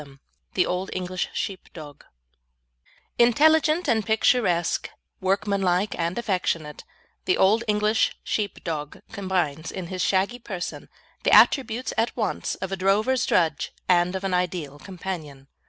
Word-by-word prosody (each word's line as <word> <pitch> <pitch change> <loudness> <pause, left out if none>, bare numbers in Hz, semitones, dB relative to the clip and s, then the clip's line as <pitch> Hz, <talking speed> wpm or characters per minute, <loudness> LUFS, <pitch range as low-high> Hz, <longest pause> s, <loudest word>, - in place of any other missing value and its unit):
CHAPTER 140 -2 -13
IX 135 - -22 0.4
THE - - +3
OLD 180 +2 -2
ENGLISH 185 0 -3
SHEEPDOG 155 -7 -7 1.1
Intelligent 310 +7 +4
and 225 -4 +2
picturesque, 220 -5 +1 0.3
workmanlike 195 0 +1
and 170 +1 -2
affectionate, 180 -9 -2 0.4
the 370 - +2
Old 215 +4 +4
English 210 +1 +1
Sheepdog 165 -8 -3
combines, 180 -7 -2
in 185 - -5
his 185 -1 -3
shaggy 195 +6 +1
person, 190 -6 -6 0.3
the - - +1
attributes 250 -2 +4
at 230 +2 0
once 220 - -2
of 190 - -6
a - - 0
drover's 215 +7 +2
drudge 160 -5 +1
and 180 0 +3
of 190 - -4
an 195 -1 -1
ideal 175 -5 -2
companion. 165 -8 -7
190 Hz, 130 wpm, -24 LUFS, 175-220 Hz, 1.1 s, Intelligent